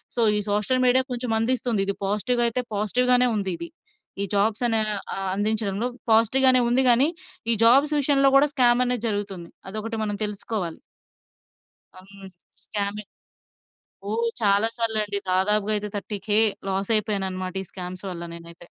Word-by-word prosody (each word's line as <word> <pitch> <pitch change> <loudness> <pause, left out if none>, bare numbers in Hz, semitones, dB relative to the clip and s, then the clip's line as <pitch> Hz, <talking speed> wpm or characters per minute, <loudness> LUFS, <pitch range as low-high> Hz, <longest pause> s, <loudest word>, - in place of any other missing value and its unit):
So, 240 - +1 0.2
ఈ - - +1
social 210 +5 0
media 255 +1 +3
కొంచెం 245 -1 -3
అందిస్తుంది. 235 -2 0
ఇది 200 - -1
పాజిటివ్‌ 210 +5 0
అయితే 235 +2 -1
పాజిటివ్‌గానే 250 +4 +2
ఉంది 195 -3 -2
ఇది 340 - -8 0.5
ఈ - - +1
జాబ్స్ 210 +3 +1
అనే 225 -1 +2 0.4
ఆహ్, 195 0 -4
అందించడంలో 210 +1 -1 0.2
పాజిటివ్‌గానే 255 +3 +4
ఉంది 255 +2 +2
కానీ, 245 +4 +5 0.4
ఈ - - +4
జాబ్స్ 275 +6 +4
విషయంలో 275 -1 +3
కూడా 285 +2 +4
స్కామ్ 245 -3 +3
అనేది 245 -2 -1
జరుగుతుంది 200 -5 -4 0.2
అదొకటి 215 +3 -5
మనం 205 -1 -2
తెలుసుకోవాలి. 200 -4 -5 1.2
హ్మ్. 195 +1 -13 0.3
స్కామే 205 0 -3 1.1
ఓహ్! 230 +2 -1
చాలా 205 +1 +3
సార్లు 225 -2 +1
అండి 205 -1 -1
దాదాపుగా 205 +3 +2
అయితే 210 0 -3
30,000 205 0 -1 0.3
లాస్ 195 +2 -2
అయిపోయాను 210 -2 -1
అన్నమాట. 185 0 -5
ఈ - - -10
స్కామ్స్ 185 0 -6
వల్ల 170 -1 -6
నేనైతే. 170 0 -12
215 Hz, 145 wpm, -24 LUFS, 200-245 Hz, 1.2 s, కానీ